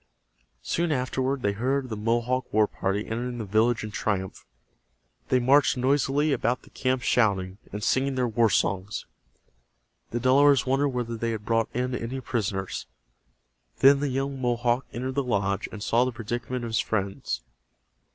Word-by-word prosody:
Soon 170 -1 0
afterward 130 0 -1
they 100 - +2
heard 130 +5 -1
the 110 - -3
Mohawk 120 +4 0
war 110 0 +4
party 100 0 -2
entering 120 +2 -3
the 110 - -4
village 110 +4 +2
in 110 - -5
triumph. 95 - -3 0.8
They 130 - +4
marched 135 +3 +4
noisily 140 +3 +2
about 125 -1 0
the - - -18
camp 130 -2 -1
shouting, 100 -4 +1
and 105 +1 -5
singing 135 +4 +1
their 125 -1 +1
war 115 0 +3
songs. 100 +1 0 1.0
The 120 - -2
Delawares 140 +3 +5
wondered 135 +2 +2
whether 120 -3 -3
they 115 +1 -2
had 110 -2 -4
brought 115 -1 +1
in 125 +1 -2
any 125 +2 -3
prisoners. 100 -7 -3 0.9
Then 140 +1 +6
the 145 0 -1
young 135 +1 -2
Mohawk 120 +1 +1
entered 130 +2 -4
the 140 +1 0
lodge, 100 -5 -1
and 105 -1 -7
saw 120 +2 +3
the 130 - -1
predicament 120 +1 -4
of - - -4
his 115 - +1
friends. 95 - -2
120 Hz, 160 wpm, -26 LUFS, 110-130 Hz, 1.0 s, Then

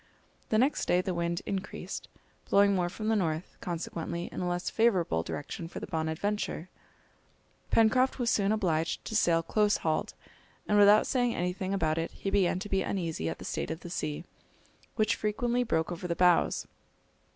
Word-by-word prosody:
The 215 - +2
next 265 +6 +2
day 180 - +4
the 185 0 -2
wind 170 +1 -2
increased, 195 +1 -5 0.4
blowing 200 0 +5
more 180 -2 +1
from 215 +4 -5
the 225 - +3
north, 165 -4 -1
consequently 170 0 -4
in - - -6
a 180 - -1
less 175 0 -2
favourable 190 - +2
direction 145 - -5
for - - -7
the - - -5
Bonadventure. 165 +2 -2 1.0
Pencroft 255 +4 +3
was 245 -3 +1
soon 200 -1 +2
obliged 165 -7 0
to 220 - -4
sail 165 -5 +3
close 210 +4 +2
hauled, 155 -1 0 0.5
and 210 0 +4
without 205 +1 +7
saying 245 -2 +1
anything 180 +2 -2
about 165 -5 +1
it 165 - -2
he 195 - -4
began 190 -3 +2
to 200 +3 -5
be 195 -1 +1
uneasy 165 - -2
at 80 - -4
the - - -10
state - - -3
of 160 - -5
the 175 - -8
sea, 150 -3 -3 0.7
which 215 0 +2
frequently 240 +3 0
broke 165 -8 0
over 175 +1 -4
the 170 - -1
bows. 180 -2 +3
185 Hz, 175 wpm, -30 LUFS, 165-210 Hz, 1.0 s, without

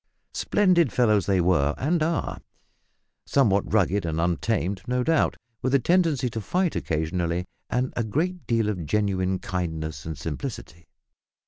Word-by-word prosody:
Splendid 180 - +3
fellows 110 -6 +2
they 95 -2 +3
were, 80 -5 +2
and 160 +5 0
are; 165 +1 -1 0.9
somewhat 100 -8 +2
rugged 100 -1 +2
and 80 -1 -2
untamed, 90 +3 0
no 125 0 +1
doubt, 160 +3 +2 0.2
with 130 +2 +1
a - - +5
tendency 165 -3 +2
to 110 - -4
fight 180 - 0
occasionally, 85 +2 -1 0.2
and 125 +1 -1
a 120 - 0
great 170 - -2
deal 115 -3 +1
of 90 -7 -3
genuine 95 0 +1
kindness 80 -6 -4
and 80 -2 -5
simplicity. 80 - -6
105 Hz, 140 wpm, -25 LUFS, 85-130 Hz, 0.9 s, a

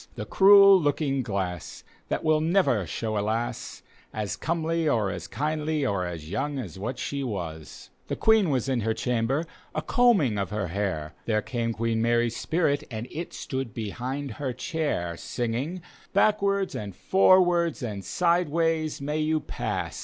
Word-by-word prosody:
The - - -5
cruel 195 -1 +7
looking 145 -2 0
glass 95 -7 -4 0.2
that - - -2
will 155 -1 +3
never 160 - +2
show 110 +4 -2
a - - 0
lass 110 +3 -3 0.3
As 105 -3 -3
comely 165 -1 0
or 110 -7 +1
as - - -6
kindly 155 0 -1
or 95 -7 0
as 80 -3 -7
young 135 - -2
as 95 - -6
what 120 +6 -4
she 140 +4 -3
wasi 85 - -6 0.2
The - - -2
Queen 220 -5 +4
was 130 -4 0
in 130 -3 0
her 110 +1 0
chamber, 125 +7 0 0.3
a - - -1
combtng 180 - +3
of 100 - -3
her 105 -3 -3
hair. 80 -5 -2
There 110 -2 +1
came 115 -2 -2
Queen 115 0 -1
Mary's 120 0 +2
spirit 145 +3 0
and 110 +1 -5
It 170 +2 -5
stood 130 -4 -5
behind 125 +5 -4
her 130 +3 -4
chair, 125 - -2
Singing, 130 - -3
" - - -28
Backward^ 200 -1 +2
and 100 -3 -6
forwards 175 -5 +3
and 105 -4 -4
sideways 165 - +1
may 150 +2 -2
you 155 0 +1
pass. - - -4
130 Hz, 160 wpm, -26 LUFS, 110-160 Hz, 0.3 s, cruel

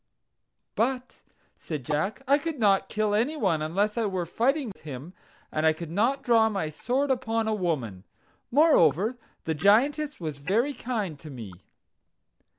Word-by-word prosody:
"But," 250 +3 -2 0.4
said 150 -6 -6
Jack, 190 - -2
"I 280 +2 +5
could 325 0 -4
not 200 -4 +3
kill 215 -1 0
any 245 +9 +1
one 185 - +1
unless 200 +8 0
I 225 - +1
were 185 -3 -2
fighting 260 - 0
with - - -24
him; 145 +3 -8 0.4
and 155 - -1
I 160 0 +5
could 165 0 -8
not 245 +9 +1
draw 225 -2 +4
my 195 -7 -2
sword 260 - -1
upon 225 -3 0
a 220 - +1
woman. 140 - -2 0.5
Moreover, 235 - +4 0.2
the 160 - -1
Giantess 270 - +2
was 155 -4 -5
very 225 - +1
kind 215 - -4
to 155 - -10
me." 115 -8 -8
210 Hz, 155 wpm, -27 LUFS, 160-250 Hz, 0.5 s, I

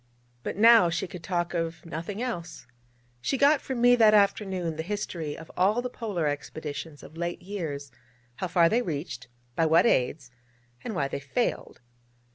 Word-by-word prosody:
But 165 - -5
now 225 -4 +7
she 170 +3 -1
could 180 -2 -9
talk 175 0 -2
of 165 -1 -3
nothing 170 +7 -5
else. 175 -9 -5 0.6
She 270 - 0
got 285 +2 +4
from 260 -3 -4
me 245 0 +7
that 215 -2 +6
afternoon 190 -5 +1
the 160 - -3
history 170 -5 -4
of 165 - -11
all 200 +6 +3
the 250 - -4
Polar 205 -10 -3
expeditions 145 +1 -5
of 160 - -13
late 175 +1 -3
years, 155 -8 -5 0.5
how 185 - -2
far 175 -1 +4
they 230 +8 +2
reached, 145 - -5 0.3
by 165 - +2
what 160 +6 +5
aids, 130 - +1 0.5
and 225 -4 -4
why 140 -4 0
they 140 - -4
failed. 145 - -2
175 Hz, 170 wpm, -27 LUFS, 160-210 Hz, 0.6 s, now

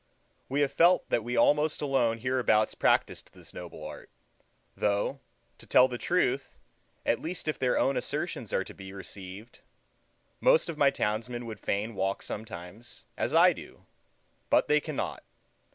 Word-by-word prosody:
We 140 +2 +1
have 140 -1 +2
felt 175 +2 +4
that 115 - +2
we 120 +2 -3
almost 150 +1 +3
alone 130 -6 +1
hereabouts 120 -3 +2
practiced - - +1
this - - -13
noble 85 -3 -9
art; 75 - -9 0.7
though, 105 +6 0 0.4
to - - -14
tell 125 - +6
the 125 -2 -6
truth, 140 -7 0 0.5
at 115 - +1
least 165 0 -5
if 155 - -1
their 125 -1 +2
own 135 - +2
assertions 125 - -3
are - - +1
to - - -11
be 95 0 -10
received, 100 +2 -9 0.8
most - - +4
of 155 - -5
my 140 - +6
townsmen 120 +1 -2
would 110 -3 -7
fain 105 +5 -2
walk 95 0 -1
sometimes, 105 +2 -8
as - - -1
I - - +7
do, - - -12 0.6
but - - +4
they 150 - +4
cannot. 155 -2 -4
120 Hz, 155 wpm, -29 LUFS, 105-140 Hz, 0.8 s, I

